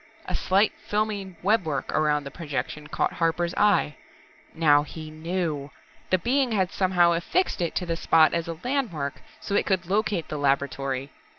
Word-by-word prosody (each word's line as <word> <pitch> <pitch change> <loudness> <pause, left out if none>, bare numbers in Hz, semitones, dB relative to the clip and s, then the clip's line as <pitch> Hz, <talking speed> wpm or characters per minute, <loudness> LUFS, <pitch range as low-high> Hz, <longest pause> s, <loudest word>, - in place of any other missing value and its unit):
A - - -4
slight 195 +3 +2
filmy 205 -3 -1
webwork 180 -9 +1
around 150 -1 +1
the 140 - -8
projection 150 -1 -4
caught - - -1
Harper's 170 +1 0
eye. 205 -8 +2 0.6
Now 150 -3 +5
he 155 +1 -8
knew 155 -3 -3 0.4
the 185 - +4
Being 250 +4 +1
had 190 -4 +1
somehow 180 -2 +3
affixed 180 - 0
it 170 - -1
to 180 - -1
the 165 -1 -1
spot 160 -1 +4
as 170 -1 -1
a 165 -1 -5
landmark, 215 - -2 0.2
so 200 - -5
It 200 - +2
could 185 -2 +1
locate 200 -2 0
the 150 - -4
laboratory. 135 -1 -1
170 Hz, 165 wpm, -26 LUFS, 150-195 Hz, 0.6 s, Now